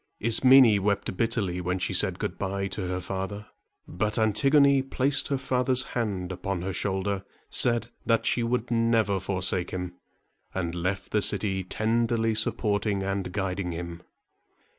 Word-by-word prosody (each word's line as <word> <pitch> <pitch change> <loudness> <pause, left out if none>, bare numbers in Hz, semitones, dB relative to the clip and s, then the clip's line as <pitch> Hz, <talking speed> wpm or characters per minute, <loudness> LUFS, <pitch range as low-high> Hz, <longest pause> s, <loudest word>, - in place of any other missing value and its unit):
Ismene 115 -1 +5
wept 100 -1 -1
bitterly 100 -5 -1
when 90 +1 -1
she 90 - -1
said - - +2
good - - -4
by 100 0 -2
to 95 -1 -4
her 90 0 -2
father; 95 +3 -5 0.4
but 105 +5 -2
Antigone 135 +6 +4
placed 135 +1 0
her 140 - 0
father's 130 0 +1
hand 100 -6 -2
upon 90 0 -4
her 95 +1 -3
shoulder, 95 0 -2 0.3
said 120 0 +2 0.2
that 115 -1 +2
she 120 - +1
would 120 0 -1
never 115 -4 +2
forsake 90 -1 -1
him, 90 -1 -5 0.6
and 85 -3 -2
left 90 +3 -3
the 105 - +2
city, 95 -1 +1
tenderly 115 +3 0
supporting 105 -2 0
and 95 -1 -3
guiding 95 -2 -3
him. 85 0 -6
100 Hz, 145 wpm, -26 LUFS, 95-115 Hz, 0.6 s, Ismene